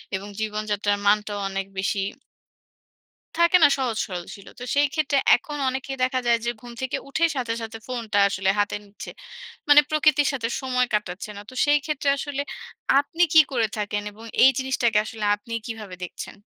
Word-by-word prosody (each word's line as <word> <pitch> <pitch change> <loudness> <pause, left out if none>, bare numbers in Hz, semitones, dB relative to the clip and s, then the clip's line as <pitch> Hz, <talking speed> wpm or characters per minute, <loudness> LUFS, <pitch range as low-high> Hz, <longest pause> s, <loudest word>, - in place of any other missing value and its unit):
এবং 195 +1 -5
জীবনযাত্রার 210 -1 -1
মানটাও 205 0 +2
অনেক 195 0 -3
বেশি" 195 +1 0 1.3
থাকে 340 +2 +5
না? - - +10
সহজ 250 -5 -1
সরল 180 -2 -5
ছিল। 200 - -15
তো - - -7
সেইক্ষেত্রে 290 0 +1 0.2
এখন 295 -1 -6
অনেকেই 265 +1 -4
দেখা 255 0 +1
যায় 235 0 +4
যে 240 - +1
ঘুম 245 - -10
থেকে 260 - -2
উঠেই 330 +4 +2
সাথে, 245 -4 -1
সাথে 225 0 -6
ফোনটা 230 -5 -3
আসলে 190 -1 -1
হাতে 205 0 +1
নিচ্ছে। 200 0 -10 0.6
মানে 290 0 +9
প্রকৃতির 305 -2 +3
সাথে 235 -4 -2
সময় 250 -2 +1
কাটাচ্ছে 205 -1 -2
না। - - -7
তো - - -13
সেইক্ষেত্রে 295 0 +1
আসলে 285 0 -3 0.6
আপনি 305 +5 0
কী 315 - +10
করে 235 -4 +2
থাকেন? 205 -1 -2
এবং 220 +2 -14 0.2
এই 260 - +9
জিনিসটাকে 250 -4 +1
আসলে 220 -1 -6
আপনি 230 +3 -12
কীভাবে 215 -5 -7
দেখছেন? 180 - -8
235 Hz, 165 wpm, -24 LUFS, 210-275 Hz, 1.3 s, না